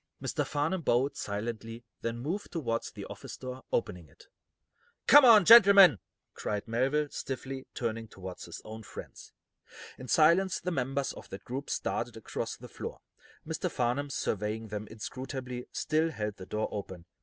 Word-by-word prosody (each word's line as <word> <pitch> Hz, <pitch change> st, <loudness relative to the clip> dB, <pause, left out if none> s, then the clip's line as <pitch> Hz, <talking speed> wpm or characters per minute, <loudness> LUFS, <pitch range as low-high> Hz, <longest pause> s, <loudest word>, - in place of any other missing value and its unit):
Mr. -, -, -1 dB
Farnum 160 Hz, +5 st, -1 dB
bowed, 135 Hz, 0 st, +2 dB
silently, 115 Hz, +2 st, -5 dB, 0.2 s
then 115 Hz, 0 st, -2 dB
moved 165 Hz, +12 st, -4 dB
toward 115 Hz, -9 st, -1 dB
the -, -, -6 dB
office -, -, -9 dB
door, 130 Hz, 0 st, -7 dB
opening 90 Hz, -8 st, -2 dB
it. -, -, -20 dB, 0.8 s
"Come 290 Hz, +1 st, +9 dB
on, 220 Hz, -6 st, +8 dB
gentlemen," 200 Hz, -, +9 dB, 0.3 s
cried 105 Hz, +1 st, -3 dB
Melville, 135 Hz, +6 st, +1 dB
stiffly, 135 Hz, 0 st, -5 dB
turning 115 Hz, -2 st, -3 dB
toward 95 Hz, -3 st, -9 dB
his -, -, -9 dB
own 110 Hz, +1 st, -8 dB
friends. -, -, -10 dB, 0.7 s
In 130 Hz, -, -8 dB
silence 170 Hz, +6 st, +4 dB
the 180 Hz, -, -3 dB
members 135 Hz, -2 st, -1 dB
of -, -, -12 dB
that 100 Hz, +1 st, -8 dB
group 135 Hz, +3 st, -5 dB
started -, -, -2 dB
across -, -, -4 dB
the -, -, -11 dB
floor. -, -, -7 dB, 0.4 s
Mr. 160 Hz, +3 st, -2 dB
Farnum, 130 Hz, +1 st, -1 dB
surveying 110 Hz, -3 st, -2 dB
them 105 Hz, 0 st, -5 dB
inscrutably, 125 Hz, +3 st, -6 dB
still 160 Hz, +1 st, +1 dB
held 105 Hz, -8 st, -4 dB
the 95 Hz, -, -10 dB
door 110 Hz, 0 st, -1 dB
open. 95 Hz, -4 st, -6 dB
125 Hz, 155 wpm, -30 LUFS, 110-155 Hz, 0.8 s, Come